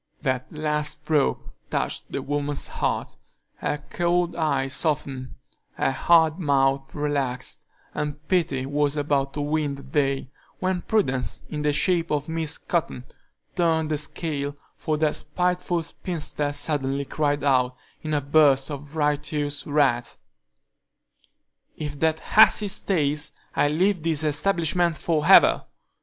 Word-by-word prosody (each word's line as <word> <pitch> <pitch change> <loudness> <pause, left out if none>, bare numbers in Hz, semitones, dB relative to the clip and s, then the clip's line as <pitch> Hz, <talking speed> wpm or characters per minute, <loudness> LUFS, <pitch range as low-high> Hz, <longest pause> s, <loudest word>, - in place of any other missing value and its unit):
That 130 -3 -1
last 150 -1 -2
stroke 150 -3 0 0.2
touched - - -3
the - - -3
woman's 145 0 -2
heart; - - -2 0.4
her 145 0 -3
cold 175 0 +1
eye 140 -5 0
softened, 140 -2 -2 0.4
her - - 0
hard 160 +3 +3
mouth 135 -3 +1
relaxed, 140 -4 -2 0.3
and 150 0 -4
pity 160 -8 +1
was 145 +1 0
about 140 -2 0
to 145 - -2
win 145 -1 -1
the 140 - -11
day, 135 -1 -1 0.3
when 185 -1 -1
prudence, 135 - -1
in 150 - -3
the 150 0 +2
shape 170 +2 +1
of 150 -1 -1
Miss 160 -1 0
Cotton, 165 -7 -2 0.5
turned 160 -2 +1
the 150 - +1
scale, 145 -1 -3 0.2
for 155 -1 -2
that 155 -1 +1
spiteful 180 +2 -1
spinster 155 -3 -3
suddenly 140 -1 0
cried 145 -1 -1
out, 130 -3 +2 0.3
in 155 -1 -2
a 145 - +1
burst 140 -1 +4
of 145 +1 -8
righteous 145 -1 -1
wrath: 140 -5 +1 1.6
"If 145 -2 -5
that 160 0 +1
hussy 210 -1 +5
stays, 150 -6 0 0.2
I - - +3
leave 180 +5 +1
this 160 -1 0
establishment 170 +1 +1
for 155 -2 0
ever!" 195 - +7
150 Hz, 130 wpm, -24 LUFS, 140-160 Hz, 1.6 s, ever